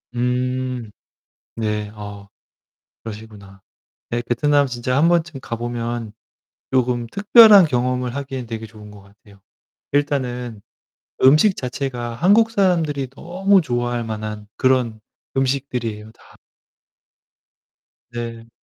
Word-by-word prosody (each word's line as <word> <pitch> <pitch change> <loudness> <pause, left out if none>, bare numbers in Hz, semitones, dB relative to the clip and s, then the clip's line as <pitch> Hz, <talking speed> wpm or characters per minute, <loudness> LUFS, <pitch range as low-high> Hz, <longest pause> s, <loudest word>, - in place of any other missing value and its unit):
음. 125 -1 -1 0.7
네. 105 -2 -2
아 100 -1 -9 0.8
그러시구나. 105 -3 -10 0.5
네, 120 0 -1
베트남 145 +4 +2
진짜 125 +1 -2
한번쯤 160 -2 +2
가보면 115 -2 -4 0.6
쪼끔 125 -2 +1
특별한 205 - +7
경험을 125 -2 -1
하기엔 135 -3 -5
되게 115 -1 -6
좋은 105 -1 -13
것 105 -1 -13
같아요. 100 0 -21 0.5
일단은 125 -6 -1 0.6
음식 155 +9 +6
자체가 125 -2 -4
한국 205 - +4
사람들이 165 - +1
너무 185 +7 +1
좋아할 120 -3 -2
만한 110 -1 -6
그런 125 -4 +1 0.4
음식들이에요. 125 -5 -2
다. - - -21 1.8
네. 115 -1 -6
125 Hz, 225 characters per minute, -21 LUFS, 115-140 Hz, 1.8 s, 특별한